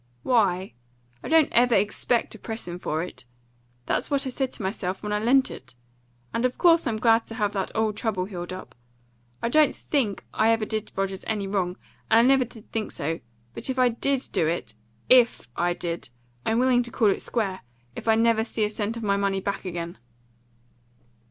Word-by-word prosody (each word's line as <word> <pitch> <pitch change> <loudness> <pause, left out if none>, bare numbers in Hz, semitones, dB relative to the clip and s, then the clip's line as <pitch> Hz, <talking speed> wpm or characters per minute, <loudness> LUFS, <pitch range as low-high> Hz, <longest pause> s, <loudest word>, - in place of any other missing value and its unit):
"Why, 195 -6 +2 0.5
I - - -5
don't 320 -2 +4
ever 240 -1 +5
EXPECT 210 +4 +1
to 220 - -7
press 225 -1 -6
him 175 0 -5
for 160 -2 -2
it. 180 - -9 0.6
That's - - -1
what 280 -2 +1
I 260 - -2
said 265 0 -2
to - - -5
myself 190 -1 -3
when 210 0 -2
I 210 - +1
lent 260 +5 +3
it. - - -11 0.6
And 230 - 0
of 255 0 0
course 335 -2 +5
I'm 225 -2 0
glad 225 0 +3
to 225 - -7
have 210 -3 0
that 195 -2 -2
old 220 -1 0
trouble 205 -6 -1
healed 180 -3 -6
up. 185 -9 -8 0.7
I 235 - +1
don't 305 +3 +4
THINK 240 -9 -1
I 220 - +3
ever 225 -1 +2
did 215 0 -3
Rogers 195 0 -2
any 215 -3 -1
wrong, 190 -2 -1 0.3
and 220 - +6
I 230 - +7
never 265 -1 +4
did 230 -2 -15
think 220 -1 -2
so; 160 +3 -3 0.3
but - - -4
if 260 - -2
I 255 -1 +5
DID 265 +3 -1
do 160 - +1
it 160 -9 -2 0.3
IF 245 - +5
I 175 0 +1
did 170 -5 -4 0.4
I'm 225 - +2
willing 250 0 +4
to 240 0 -4
call 215 -3 +3
it - - -2
square, 195 -5 -2 0.3
if - - -8
I 220 - +5
never 225 0 +3
see 225 -1 -2
a 210 - 0
cent 215 +2 -2
of 230 - -6
my 200 -1 +2
money 200 -1 0
back 200 +1 -3
again." 170 -1 -5
220 Hz, 205 wpm, -25 LUFS, 190-240 Hz, 0.7 s, I